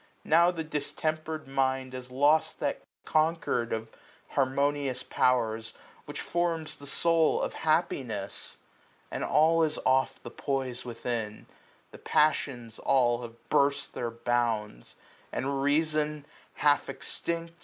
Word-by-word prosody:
Now 170 +2 +5
the 165 -3 -3
distemper^ 155 +1 -3
mind 130 -1 0
Has 125 0 -7
lost 145 +5 +3
that - - -1 0.2
concord 155 -7 +1
of 110 0 -3 0.4
harmonious 140 0 0
powers, 115 -3 +1
2ys - - -23 0.3
Which - - -5
forms 170 -2 -1
the 140 - -12
soul 165 +1 +3
of - - -2
happiness; 130 - -1 0.5
and - - -3
all 160 +2 +4
Is 155 -1 +1
off 130 0 +2
the - - -7
poise 130 -3 -2
within: 115 -3 -4 0.5
the - - -12
passions 125 -7 +1
all 125 -3 +3
Have 115 -1 -11
burst 140 0 +2
their 120 - -2
bounds; 115 - -1 0.4
and 135 +1 -1
reason 150 0 +1 0.3
half 145 -1 +3
extinct. 170 0 -3
140 Hz, 120 wpm, -29 LUFS, 120-155 Hz, 0.5 s, Now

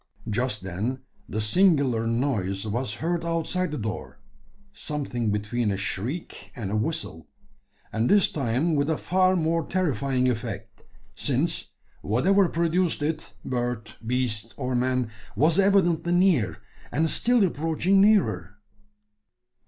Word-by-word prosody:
Just 115 -2 -1
then, 110 +9 -3 0.3
the 105 - -2
singular 130 - +3
noise 110 -6 -1
was 110 +1 -2
heard 170 +1 -2
outside 170 +2 -1
the 150 - -4
door 110 -3 -5 0.5
something 135 - -3
between 105 +2 -1
a 100 - -1
shriek 105 - -4
and 100 -5 -4
a - - 0
whistle 110 0 -3 0.7
and 115 +2 +1
this 205 -2 +5
time 140 +4 0
with 145 0 +1
a 160 - +1
far 185 0 +2
more 165 -1 +1
terrifying 140 - 0
effect: 115 -2 -4 0.3
since, 145 +8 -1 0.3
whatever 180 - +3
produced 170 -1 0
it 155 +1 -3
bird, 120 -3 -3
beast, 115 -2 -2
or 130 -2 -2
man 125 -1 0 0.2
was 155 - +3
evidently 175 -4 +3
near, 165 - +3 0.3
and 160 +2 +1
still 235 - +3
approaching 165 +4 +2
nearer. 110 - +2
130 Hz, 125 wpm, -26 LUFS, 110-170 Hz, 0.7 s, this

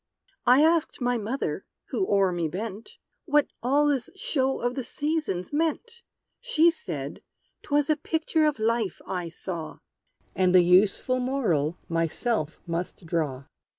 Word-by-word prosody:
I 255 +4 +7
asked 325 0 +2
my 245 -2 +1
mother, 230 +6 -3 0.3
who 380 - -1
o'er 195 -2 +3
me 170 -2 -1
bent, 205 +5 -6 0.3
What 295 -2 +4 0.2
all 280 +5 +3
this 280 -5 0
show 270 -8 0
of 245 +1 -1
the 260 -1 -3
Seasons 295 - -2
meant? 330 +10 -1 0.4
She 340 -9 +4
said 470 +8 -6 0.4
'twas 290 -1 +1
a 310 - +3
picture 315 0 +1
of 300 - 0
Life, 220 -3 0
I 180 -3 -3
saw; 165 -1 -6 0.6
And 185 -1 +3
the 180 - +8
useful 195 +8 +3
moral 195 - 0
myself 165 - -1
must 170 +1 -4
draw! 155 -6 -2
240 Hz, 140 wpm, -26 LUFS, 180-295 Hz, 0.6 s, the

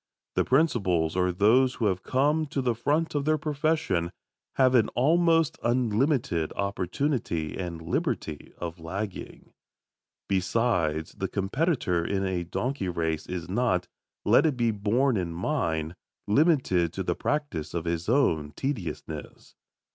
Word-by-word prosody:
The - - +2
principals, 95 - +2
or 90 0 +2
those 115 +8 +4
who 115 - -1
have 95 -3 +1
come 150 +7 +1
"to 140 - -3
the 120 -2 +2
front 150 +8 0
of 145 -1 0
their 155 0 +3
profession," 150 - 0 0.5
have 130 -1 +4
an 115 -4 +5
almost 165 +3 +3
unlimited 120 - +1
opportunity 100 - -1
and 85 -3 -4
liberty 90 - -3
of 85 0 -6
lagging. 95 +4 -6 0.7
Besides, 90 -5 0
the 95 - 0
competitor 100 - 0
in 95 +2 -1
a 90 -2 -1
donkey 115 +3 -2
race 80 -2 -2
is 90 -2 -4
not, 100 -2 0 0.4
let - - +5
it 145 -5 -1
be 120 -2 +2
borne 110 +5 +1
in 85 -3 -2
mind, 85 - -1 0.3
limited 105 - +2
to 95 - -3
the 90 - 0
practice 145 - -2
of 85 0 -2
his 85 +2 -2
own 80 - +2
tediousness. 110 - -5
105 Hz, 135 wpm, -27 LUFS, 85-135 Hz, 0.7 s, an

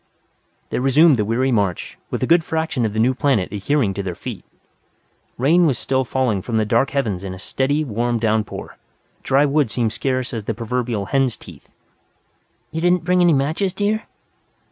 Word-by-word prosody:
They - - -1
resumed 135 +3 +5
the 105 - +1
weary 125 +5 +1
march, 100 -7 -1
with - - -3
a - - +3
good 165 0 +4
fraction 160 -7 -1
of 105 - -6
the 110 - -2
new 125 +4 +3
planet 130 -7 +1
adhering 105 +2 0
to 100 - -3
their 95 -3 -4
feet. - - -7 0.9
Rain 165 +7 +4
was 135 - +1
still 130 0 0
falling 125 -5 0
from 115 +3 -2
the 110 - +2
dark 115 +5 +2
heavens 110 -10 -2
in 95 -1 -5
a - - -10
steady, 135 +9 -1
warm 120 -2 -1
downpour. 110 -1 -2 0.4
Dry 135 +2 +3
wood 145 -3 +1
seemed 115 -1 -1
scarce 130 +1 -2
as 110 -3 -4
the 110 - -2
proverbial 115 -2 -2
hen's 135 +1 0
teeth. - - -14 1.0
"You 160 +1 -3
didn't 175 0 +2
bring 180 +1 +2
any 175 -1 +5
matches, 160 +8 0
dear?" 210 +2 -1
130 Hz, 185 wpm, -20 LUFS, 110-150 Hz, 1.0 s, resumed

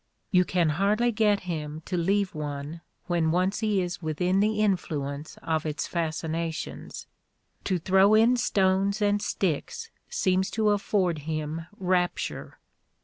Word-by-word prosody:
You 180 -2 +4
can 175 -3 +1
hardly 205 +9 +2
get 210 -2 +2
him 155 -3 -5
to 185 - -3
leave 195 +3 +1
one 150 +1 -5 0.2
when 170 -2 +1
once 185 +4 +1
he 210 -4 +1
is 180 0 -5
within 180 +4 0
the 210 +1 +1
influence 155 -7 -2
of 160 -2 0
its 155 -1 -3
fasci 165 -2 -2
nations. 165 0 -4 0.6
To 185 - +1
throw 190 +4 +4
in 230 +3 +5
stones 200 -4 +1
and 205 -1 +2
sticks 205 - -2 0.2
seems 190 - +1
to 215 -1 +3
afford 195 -5 +1
him 155 +2 -4
rapture. 180 -1 -1
180 Hz, 140 wpm, -27 LUFS, 160-205 Hz, 0.6 s, in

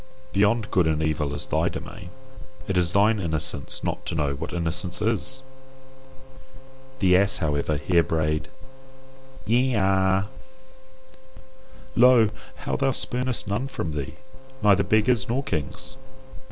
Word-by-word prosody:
Beyond 105 +2 +2
good 90 -3 +3
and 80 0 0
evil 75 -2 -1
is - - -3
thy - - +1
domain. 90 - -8 0.6
It 95 - -1
is 90 -1 +2
thine 105 +3 +3
innocence 80 -5 -2
not - - -3
to - - -2
know 75 -3 0
what 70 - -6
innocence 85 +1 -3
is. 115 +5 -1 1.5
The 95 -6 +4
ass, 100 +2 +4
however, 75 -1 0
here 85 +3 +3
brayed 75 -2 -1 1.0
YE 125 +4 +2
A. 95 0 +2 1.7
Lo! 120 -3 +6 0.2
how - - -3
thou 135 -1 +1
spurnest 125 -3 -1
none 105 +7 -1
from 110 -11 -4
thee, 70 -3 -5 0.5
neither 100 -2 +5
beggars 110 +5 +2
nor 130 +4 0
kings. 80 - -4
95 Hz, 125 wpm, -25 LUFS, 80-115 Hz, 1.7 s, Lo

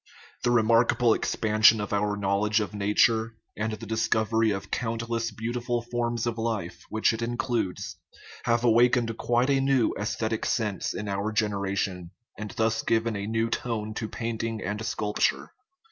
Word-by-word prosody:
The - - +2
remarkable 115 0 +4
expansion 110 0 +4
of 105 0 -3
our 105 0 0
knowl 100 +1 +1
edge 105 +1 +3
of 105 -1 -3
nature, 110 +2 +2 0.2
and 110 +1 -2
the 110 +1 -7
discovery 110 0 +1
of 100 -2 -4
countless 115 0 -2
beauti 115 +3 -4
ful 120 -1 -1
forms 120 -1 -2
of 120 -1 -2
life, 110 -6 -3
which 110 +1 +2
it 110 - -4
includes, 115 -6 -2 0.5
have 115 0 +2
awakened 120 0 +3
quite 120 +3 +2
a 135 -1 +3
new 135 -3 +2
aesthetic 110 +1 -2
sense 105 -5 -1
in 105 - -4
our 100 +2 -2
generation, 100 -4 -1 0.3
and 105 +1 -6
thus 110 0 +1
given 115 0 0
a 100 0 -4
new 115 +1 0
tone 110 -3 -2
to 110 0 -4
painting 115 -1 -3
and 105 +3 -3
sculpture. 105 -1 -1
110 Hz, 160 wpm, -27 LUFS, 105-115 Hz, 0.5 s, remarkable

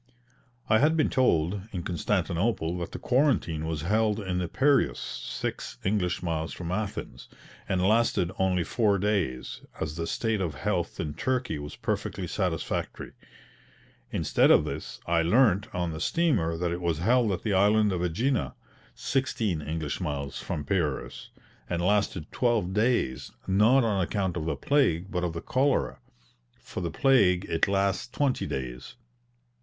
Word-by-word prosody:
I 110 - +4
had 155 +3 +3
been 155 - +2
told, 95 -7 +2
in 90 -3 -4
Constantinople, 90 0 -1
that 85 - -5
the - - -5
quarantine 120 - +1
was 80 -2 -3
held 105 +3 +1
in 95 -3 -2
the 90 - -1
Piraeus 140 - +2
(six - - -5
English 95 -3 0
miles 80 -2 -2
from 85 -1 -5
Athens), 100 +1 -4 0.4
and 90 -1 +1
lasted 110 -5 +2
only 95 -2 +2
four 105 +1 +2
days, 95 -11 -1 0.2
as 75 +1 -3
the 85 0 -2
state 110 -3 -1
of 80 -6 -2
health 70 - -2
in 75 - -3
Turkey 125 - -1
was 75 0 -7
perfectly - - -3
satisfactory. - - -3 1.0
Instead - - +2
of - - +6
this, - - -6
I 85 0 +2
learnt 105 +2 +3
on 90 -2 -2
the 80 - -6
steamer 85 - +1
that 85 0 -1
it 85 +1 -3
was 85 -3 0
held 115 +5 +3
at 90 - -3
the 105 - 0
island 105 +2 +4
of 90 -2 -1
AEgina 110 +10 0 0.4
(sixteen 110 - -1
English 80 -1 -3
miles 70 -2 -3
from 75 - -4
Piraeus), 85 -8 -2 0.4
and 85 - -1
lasted 95 -3 0
twelve 115 -7 +1
days, 105 - 0
not 110 +7 +4
on 105 -4 +1
account 95 -1 -1
of 80 -3 -3
the 80 -2 -1
plague 95 - +1
but 90 -1 -1
of 85 -2 -1
the 85 - -5
cholera. 135 +1 +1 0.6
For - - -7
the 85 - -2
plague 100 - +3
it 80 +3 +1
lasts 100 0 0
twenty 130 +1 0
days. 65 - -5
95 Hz, 155 wpm, -27 LUFS, 85-110 Hz, 1.0 s, of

